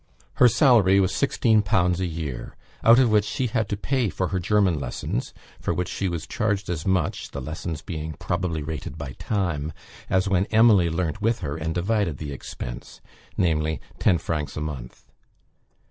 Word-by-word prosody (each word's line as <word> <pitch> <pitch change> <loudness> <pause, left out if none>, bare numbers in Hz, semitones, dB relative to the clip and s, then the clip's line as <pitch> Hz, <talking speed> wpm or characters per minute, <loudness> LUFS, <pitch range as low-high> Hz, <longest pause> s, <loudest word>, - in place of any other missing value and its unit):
Her 125 - +7
salary 115 - +5
was 95 -2 +2
16_l_. 100 -5 +2
a 95 - 0
year; 75 -7 -5 0.3
out 115 +1 +8
of 125 -3 +4
which 105 -1 +4
she 115 +5 -2
had 110 -3 -1
to 100 - -1
pay 125 +1 0
for 95 0 -2
her 95 - -1
German 95 -3 +2
lessons, 65 -2 -3 0.3
for - - -1
which 90 - -2
she 95 - -2
was 85 -2 -4
charged 100 -3 -1
as 80 -1 -4
much 95 -4 0
(the 70 - -6
lessons 80 +3 -5
being 80 -2 -5
probably 90 -1 -2
rated 75 0 -6
by 75 -3 -6
time) 85 -7 -1 0.4
as 95 +1 +2
when 95 0 +2
Emily 110 -6 +5
learnt 80 +2 -2
with 115 0 +1
her 70 -4 -3
and 80 0 -3
divided 95 -4 0
the 75 -1 -6
expense, - - -8 0.4
viz., 80 -3 +1 0.2
ten 90 - +4
francs 75 -3 -3
a - - -2
month. 70 -6 -6
90 Hz, 175 wpm, -24 LUFS, 80-105 Hz, 0.4 s, out